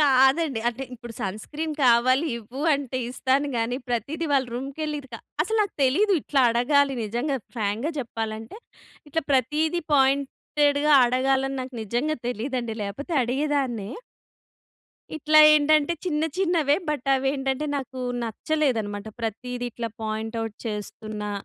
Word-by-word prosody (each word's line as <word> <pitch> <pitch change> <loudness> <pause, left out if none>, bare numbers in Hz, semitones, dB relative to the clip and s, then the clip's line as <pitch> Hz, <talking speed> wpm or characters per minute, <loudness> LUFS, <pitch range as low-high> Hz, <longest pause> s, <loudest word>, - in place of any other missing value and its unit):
కాదండి 270 -1 +4
అంటే 250 +3 -4
ఇప్పుడు 240 -1 -10
సన్క్రీన్ 295 +11 -4
కావాలి 255 +5 +4
ఇవ్వు 245 +6 -8
అంటే 270 -2 -3
ఇస్తాను 270 +3 +1
కానీ. 230 +2 0
ప్రతిది 295 +7 -2
వాళ్ళ 265 -2 +3
రూమ్‌కి 270 +4 -5
వెళ్ళి 300 -1 -2
ఇది 270 - -16
క - - -4 0.3
అసలు 445 +6 -1
నాకు 405 - -4
తెలియదు 395 +11 +3
ఇట్లా 275 -2 +1
అడగాలి 275 +4 +3
నిజంగా, 245 +6 -1 0.2
ఫ్రాంక్‌గా 220 +7 -1
చెప్పాలంటే. 225 - -5 0.5
ఇట్లా 325 +2 -1
ప్రతీది 305 +7 +1
పాయింటెడ్‌గా 285 +2 +2
అడగాలని 270 +2 +1
నాకు 255 -1 -9
నిజంగా 245 +9 -1
తెలియదండి. 240 -1 -3
లేకపోతే 245 - -5
అడిగేదాన్నే. 255 -4 -1 1.2
ఇట్లా 310 0 +5
ఏంటంటే 305 +1 +4
చిన్న 310 -3 0 0.2
చిన్నవే. 335 -6 +2
బట్ 290 -3 -2
అవి 270 0 +1
ఏంటంటే 270 +2 -1
నాకు 260 -1 -6 0.2
నచ్చలేదన్నమాట 225 -4 -1
ప్రతీది 245 +3 -4
ఇట్లా 230 0 -4
పాయింట్ 220 +1 -3
ఔట్ 220 -2 -7
చేస్తున్నా. 210 0 -5
265 Hz, 130 wpm, -25 LUFS, 235-295 Hz, 1.2 s, ఇట్లా